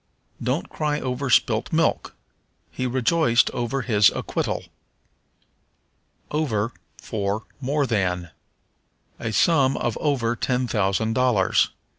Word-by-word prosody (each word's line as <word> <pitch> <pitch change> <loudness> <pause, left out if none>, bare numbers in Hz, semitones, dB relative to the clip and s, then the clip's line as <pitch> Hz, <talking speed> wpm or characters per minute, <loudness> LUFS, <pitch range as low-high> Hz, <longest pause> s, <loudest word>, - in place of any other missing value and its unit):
"Don't 130 +6 -1
cry 150 -1 -2
over 130 +1 -3
spilt - - +2
milk." - - 0 0.6
"He 130 - -2
rejoiced 125 0 +2
over 120 +2 -2
his 105 -4 +5
acquittal." - - -3 1.7
Over 125 -8 0 0.3
for 105 -1 -3 0.2
More 140 +2 0
than. 90 -7 -1 0.9
"A 115 - -3
sum 135 +3 +3
of 120 - -2
over 125 -6 +1
ten 125 +1 0
thousand 110 0 0
dollars." 120 -7 +2
120 Hz, 105 wpm, -23 LUFS, 110-135 Hz, 1.7 s, his